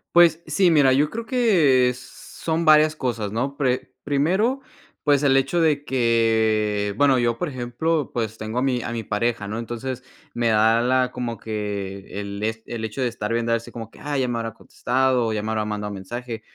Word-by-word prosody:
Pues 170 Hz, -1 st, +6 dB
sí, 175 Hz, +3 st, +3 dB
mira, 145 Hz, -4 st, +5 dB
yo 145 Hz, +3 st, +2 dB
creo 230 Hz, 0 st, -5 dB
que 155 Hz, -, +3 dB
son 160 Hz, +6 st, -5 dB
varias 155 Hz, 0 st, +5 dB
cosas, 115 Hz, -7 st, -3 dB
¿no? 135 Hz, +5 st, -2 dB
Pre 130 Hz, -3 st, -1 dB
primero, 185 Hz, -, +1 dB, 0.4 s
pues 145 Hz, -2 st, +3 dB
el 135 Hz, -2 st, +4 dB
hecho 135 Hz, +6 st, +1 dB
de 150 Hz, -3 st, +2 dB
que 110 Hz, -4 st, +1 dB
bueno, 135 Hz, -2 st, +4 dB
yo, 120 Hz, -1 st, +1 dB
por 180 Hz, -, -2 dB
ejemplo, 135 Hz, +4 st, -2 dB
pues 115 Hz, -2 st, -3 dB
tengo 110 Hz, +2 st, -5 dB
a 125 Hz, -, +1 dB
mi 125 Hz, -3 st, 0 dB
a 120 Hz, -, -4 dB
mi 115 Hz, -1 st, -4 dB
pareja, 105 Hz, +1 st, -1 dB
¿no? 110 Hz, +3 st, -4 dB
Entonces, 120 Hz, +2 st, -5 dB, 0.3 s
me 120 Hz, 0 st, 0 dB
da 110 Hz, +2 st, +4 dB
la 125 Hz, 0 st, +2 dB
como 120 Hz, -3 st, -4 dB
que 100 Hz, -3 st, -5 dB
el, 100 Hz, 0 st, -6 dB
es 110 Hz, +1 st, -3 dB
el 115 Hz, -2 st, -5 dB
hecho 110 Hz, +4 st, -5 dB
de 125 Hz, -, +2 dB
estar 115 Hz, -2 st, -4 dB
viendo 115 Hz, 0 st, 0 dB
así 115 Hz, 0 st, -3 dB
como 115 Hz, -2 st, -8 dB
que, -, -, -17 dB
ah, 145 Hz, -1 st, -3 dB
ya 130 Hz, -2 st, +1 dB
me 120 Hz, -1 st, -2 dB
habrá 115 Hz, -1 st, -5 dB
contestado 125 Hz, 0 st, 0 dB
o 110 Hz, -, -1 dB
ya 105 Hz, 0 st, -2 dB
me 110 Hz, -, -2 dB
habrá 110 Hz, -1 st, 0 dB
mandado 105 Hz, -1 st, -4 dB
mensaje. 115 Hz, +4 st, -6 dB
120 Hz, 205 wpm, -23 LUFS, 110-140 Hz, 0.4 s, Pues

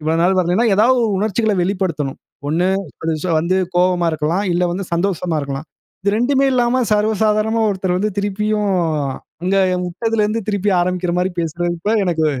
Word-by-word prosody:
இவ்ளோ 155 Hz, +1 st, 0 dB
நாள் 185 Hz, +2 st, +3 dB
வரலன்னா, 180 Hz, +5 st, +2 dB
ஏதாவது 245 Hz, +5 st, +4 dB
ஒரு 215 Hz, -, 0 dB
உணர்ச்சிகள 220 Hz, +1 st, 0 dB
வெளிப்படுத்தணும். 175 Hz, -8 st, -2 dB, 0.3 s
1, 170 Hz, +4 st, +1 dB, 0.7 s
வந்து 180 Hz, +3 st, 0 dB, 0.2 s
கோவமா 180 Hz, -1 st, +2 dB
இருக்கலாம். 160 Hz, +6 st, -1 dB
இல்ல 175 Hz, +1 st, +1 dB
வந்து 190 Hz, +2 st, -3 dB
சந்தோஷமா 175 Hz, -2 st, 0 dB
இருக்கலாம். 140 Hz, +2 st, -5 dB, 0.4 s
இது 200 Hz, -, +2 dB
2மே 270 Hz, +3 st, +2 dB
இல்லாம, 250 Hz, 0 st, +2 dB
சர்வசாதாரணமா 215 Hz, +1 st, +1 dB
ஒருத்தர் 185 Hz, -2 st, -1 dB
வந்து, 210 Hz, +2 st, 0 dB
திருப்பியும் 210 Hz, +1 st, 0 dB, 0.7 s
அங்க 190 Hz, +2 st, +1 dB, 0.3 s
விட்டதுலருந்து 220 Hz, +3 st, -1 dB
திருப்பி 205 Hz, 0 st, 0 dB
ஆரம்பிக்ற 180 Hz, -1 st, -1 dB
மாதிரி 185 Hz, 0 st, -1 dB
பேசுறப்ப, 170 Hz, +3 st, -2 dB, 0.2 s
எனக்கு 165 Hz, -3 st, +1 dB
190 Hz, 140 wpm, -18 LUFS, 175-215 Hz, 0.7 s, ஏதாவது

